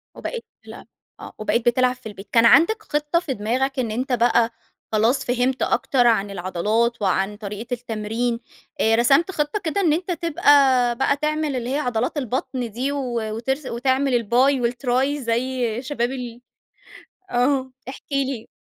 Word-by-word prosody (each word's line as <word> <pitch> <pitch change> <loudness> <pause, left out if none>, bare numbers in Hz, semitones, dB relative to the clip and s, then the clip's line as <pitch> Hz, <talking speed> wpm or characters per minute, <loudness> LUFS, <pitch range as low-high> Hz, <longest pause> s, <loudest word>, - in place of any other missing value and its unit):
وبقيت 480 -2 -6 0.2
تلعب - - -12 0.3
آه، - - -10
وبقيت 225 +2 -1
بتلعب 250 +1 +3
في 220 - -10
البيت. 200 0 -12
كان 230 0 +5
عندَك 430 - +5
خِطة 295 +3 0
في 290 -6 -4
دماغَك 255 +6 -1
إن 230 -4 -1
أنتَ 255 +3 -2
بقى 235 -1 +3 0.4
خلاص 225 +5 +2
فهمت 250 +1 0
أكتر 245 -3 +2
عن 205 -3 +2
العضلات 210 +6 -1
وعن 195 +1 0
طريقة 210 +2 -7
التمرين، 230 0 -2 0.4
آآ 225 0 +4
رسمت 275 +10 +3
خِطة 300 +5 -1
كده 380 +2 -1
إن 320 -5 +3
أنتَ 360 +2 -2
تبقى 335 -2 -4 0.6
بقى 280 +1 +1
تعمل 305 -1 -1
اللي 245 0 -3
هي 280 - 0
عضلات 245 +1 -1
البطن 250 -2 -3
دي، 260 +6 -2
و 285 - -2 0.4
وترس 265 +5 -2
وتعمل 260 +2 0
الBi 235 - -8 0.3
و 235 - +3
الTri 260 +3 0
زي 240 0 -1
شباب 255 -3 -2
ال 245 -2 -7 0.9
آه، 260 +1 +1 0.2
احكِ 265 - -8
لي. 270 -4 -2
250 Hz, 160 wpm, -22 LUFS, 230-275 Hz, 0.9 s, كان